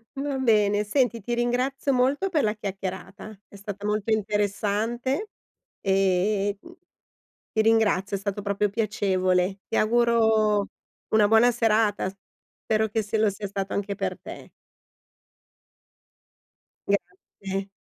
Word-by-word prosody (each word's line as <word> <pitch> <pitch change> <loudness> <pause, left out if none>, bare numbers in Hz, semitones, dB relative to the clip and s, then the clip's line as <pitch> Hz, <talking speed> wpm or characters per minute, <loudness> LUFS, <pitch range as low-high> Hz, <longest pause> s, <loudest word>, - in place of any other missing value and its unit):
Va 275 0 -2
bene, 210 -4 +3
senti, 235 0 0
ti 240 +4 -3
ringrazio 255 +3 0
molto 275 +10 +1
per 310 -5 +1
la 210 0 +1
chiacchierata. 195 +1 -6
È - - -16
stata 200 0 -7
molto 210 +1 -1
interessante 215 - -1 0.5
e, 195 +1 +1
mhmm, 345 - -14 0.8
ti 220 - +2
ringrazio. 210 -3 +2
È - - -7
stato 200 0 -3
proprio 200 0 0
piacevole. 190 -3 0
Ti - - -2
auguro 220 -2 +3 0.5
una 210 -1 +5
buona 225 +2 +5
serata. 215 -4 +1 0.5
Spero 220 0 +1
che 220 +1 -1
se 215 +1 -2
lo 215 -1 +3
sia 200 +1 -6
stato 195 -1 -4
anche 200 0 -2
per - - -3
te. - - -10 2.9
Grazie. 195 0 -4
210 Hz, 120 wpm, -25 LUFS, 200-230 Hz, 2.9 s, una